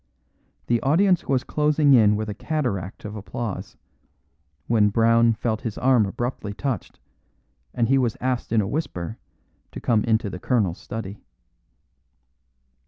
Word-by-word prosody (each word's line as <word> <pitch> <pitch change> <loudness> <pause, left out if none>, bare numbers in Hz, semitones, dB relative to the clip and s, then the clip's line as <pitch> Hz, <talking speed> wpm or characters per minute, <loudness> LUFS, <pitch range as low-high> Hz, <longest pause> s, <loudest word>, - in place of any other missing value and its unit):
The 120 -1 +1
audience 180 +6 +2
was 130 -2 +1
closing 150 -1 +2
in 105 -4 +5
with 110 +1 -3
a 105 - -3
cataract 105 - -3
of 105 +1 -6
applause, 105 0 -6 0.9
when 110 -3 +3
Brown 115 +2 +4
felt 110 0 -2
his 115 -3 -5
arm 125 -5 +3
abruptly 110 -1 -4
touched, 135 -1 -4 0.7
and 115 - 0
he 135 +2 +3
was 120 -1 0
asked 130 -3 -2
in 115 -1 +3
a 100 - -2
whisper 110 - -4 0.5
to - - -7
come 110 -3 +1
into 110 -1 +1
the 95 -2 -6
colonel's 100 -7 0
study. 105 -3 -7
115 Hz, 140 wpm, -24 LUFS, 105-130 Hz, 0.9 s, in